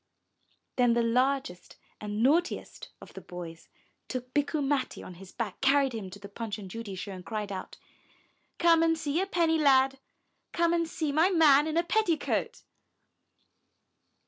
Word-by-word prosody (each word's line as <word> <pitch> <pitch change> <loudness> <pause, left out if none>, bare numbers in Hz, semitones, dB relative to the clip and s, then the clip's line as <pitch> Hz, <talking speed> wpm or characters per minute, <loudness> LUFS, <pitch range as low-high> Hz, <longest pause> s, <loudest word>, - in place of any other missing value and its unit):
Then 245 -2 +4
the 235 0 +2
largest 250 -5 0 0.2
and 210 +1 -3
naughtiest 330 +7 0
of - - -14
the - - -9
boys 170 -2 -9 0.4
took 255 0 -6
Bikku 295 +1 0
Matti 275 -1 -1
on 185 - -9
his 190 - -12
back, 220 -5 -5
carried 270 -1 +3
him 210 -4 -5
to 185 - -10
the 200 0 -10
Punch 210 +1 -5
and 195 -3 -9
Judy 225 -3 -6
show 195 +2 -6
and 185 -1 -8
cried 210 +3 -4
out, 190 - -7 0.8
''Come 335 -1 +4
and 325 0 +2
see 310 +2 -1
a 385 - -2
penny 330 -4 +1
lad! 270 -2 +4 0.5
Come 340 0 +2
and 335 -1 +1
see 310 -3 -2
my 320 +6 +3
man 305 -5 +5
in 315 +1 -2
a 340 - +3
petticoat." 345 -4 -1
265 Hz, 165 wpm, -28 LUFS, 210-320 Hz, 0.8 s, man